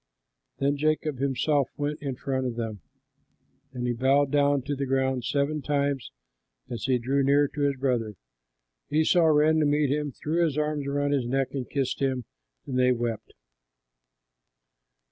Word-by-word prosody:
Then 140 +1 +1
Jacob 155 -2 0
himself 140 +1 +1
went 145 0 -3
in 135 -3 -3
front 130 0 -2
of 120 - -4
them, 110 -4 -4 0.9
and 125 -2 -4
he 120 - 0
bowed 135 +3 +2
down 145 -2 +2
to 145 +2 -2
the 140 0 -3
ground 130 -2 0
seven 145 +2 0
times, 140 -2 -1 0.6
as 120 - -4
he 130 -2 +2
drew 135 +4 0
near 140 +1 +4
to 150 - -5
his 140 -1 +2
brother. 125 -5 -1 0.7
Esau 160 +3 +3
ran 155 +1 +4
to 155 - +3
meet 145 -1 +2
him, 150 0 -1
threw 160 +6 -1
his 155 -3 0
arms 150 -2 -1
about 145 0 0
his 135 -4 0
neck, 135 +1 -1
and 130 -3 -4
kissed 135 -3 -1
him, 130 -3 -1 0.4
and 130 -2 -2
they 125 0 +4
wept. 120 -2 -3
140 Hz, 165 wpm, -27 LUFS, 130-145 Hz, 0.9 s, near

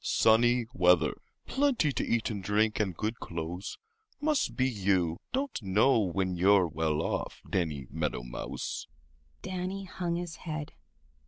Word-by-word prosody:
"Sunny 120 +2 +4
weather, 90 -6 +4 0.3
plenty 265 - +2
to - - -1
eat 115 -1 0
and 100 -2 -4
drink, 105 +2 +2
and 95 -6 -1
good 110 +2 -2
clothes—must 290 - -3
be 130 -1 +2
you 95 -7 +1
don't 270 - -2
know 105 +6 +4
when 95 -2 0
you're 95 +1 +5
well 80 0 0
off, - - -3
Danny 80 -7 -1
Meadow 75 -5 -2
Mouse." - - -5 0.6
Danny 185 +1 -3
hung 180 -2 -3
his 175 -2 -4
head. 155 -3 -5
105 Hz, 135 wpm, -30 LUFS, -, 0.6 s, you're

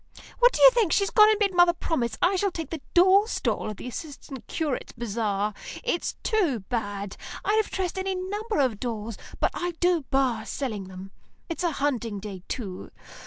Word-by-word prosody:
What - - +7
do - - -3
you - - +11
think, 455 -8 +2
she's 395 -1 +2
gone 425 -1 +7
and 435 - +3
made 400 -2 +2
mother 350 0 +6
promise 250 -11 -2
I 370 +2 +4
shall 400 +2 +1
take 330 -3 -6
the 325 -3 -4
doll 380 +4 +6
stall 455 - -1
at 210 - -6
the - - -7
Assistant 275 -1 -8
Curates' 305 -5 -3
Bazaar. 210 -3 -1 0.3
It's 485 -8 -1
too 345 - +1
bad. 205 -2 -4 0.3
I'd 430 +2 +4
have - - -12
dressed 380 0 -2
any 380 0 -1
number 415 +4 -3
of 255 -7 +1
dolls, 225 -2 -4 0.2
but - - +2
I 350 0 -3
do 350 -2 +3
bar 260 -5 +1
selling 220 -8 -3
them. 190 +1 -10 0.4
It's 335 +2 -3
a 340 -3 +1
hunting 235 -8 -1
day, 195 -2 -7
too. 195 -7 -5
290 Hz, 190 wpm, -26 LUFS, -, 0.4 s, you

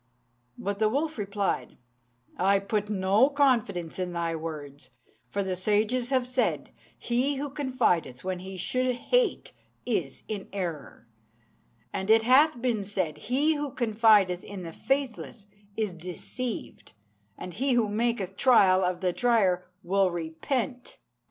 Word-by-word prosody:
But 200 +1 -3
the 215 -1 +3
wolf 295 +2 -1
replied, 200 -1 -2 0.6
"I 195 +2 +3
put 205 +1 -2
no 205 +5 +3
confidence 230 - +1
in 180 -1 -2
thy 170 -1 -1
words; 145 -4 -7 0.4
for 200 - -1
the 190 -1 -2
sages 215 +6 +1
have 260 -2 +2
said, 250 0 -1 0.3
'He 255 +4 0
who 280 +1 -4
confideth 240 - 0
when 185 -1 -3
he 190 +1 -8
should 255 +7 0
hate - - 0 0.3
is 180 - -2
in 205 -3 -5
error'; 170 - -5 0.9
and 190 +2 -3
it 220 0 +6
hath 265 +3 +5
been 235 -4 0
said, 185 -6 -3
'He 285 +6 +1
who 295 -1 -3
confideth 215 -7 +3
in 200 -3 -8
the 165 -1 -7
faithless 265 - -2 0.3
is 215 -4 -1
deceived, 185 - -6 0.4
and 180 - -7
he 265 +5 0
who 235 -3 +3
maketh 210 -3 -1
trial 190 -6 +5
of 180 0 -1
the 180 -2 +1
trier 195 -7 +2 0.2
will 195 +1 +2
repent.' 200 - -3
205 Hz, 140 wpm, -27 LUFS, 185-250 Hz, 0.9 s, it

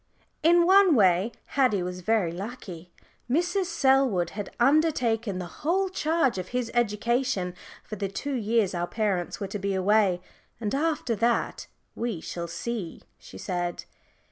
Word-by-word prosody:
In 340 +2 +5
one 380 -3 +6
way 190 0 +4 0.2
Haddie 250 -9 +2
was 180 0 -5
very 195 -3 +1
lucky. 180 -3 -8 0.4
Mrs. 355 +7 +1
Selwood 265 - +2
had 205 -1 -5
undertaken 240 - +2
the 180 - -4 0.2
whole 375 +5 +1
charge 315 - +1
of 185 - -5
his 245 0 -3
education 235 -3 0 0.3
for 215 - -7
the 200 0 -2
two 280 +9 -4
years 225 -4 +1
our 175 0 -2
parents 200 -5 -1
were 200 - -3
to 205 +2 -5
be 195 0 -1
away. 190 -1 +3 0.4
And 215 -3 -3
after 290 -5 0
that 235 +3 0 0.3
"we 230 -7 -3
shall 170 +1 -5
see," 195 0 -5 0.2
she 95 - -12
said. 175 - -3
220 Hz, 145 wpm, -26 LUFS, 185-270 Hz, 0.4 s, one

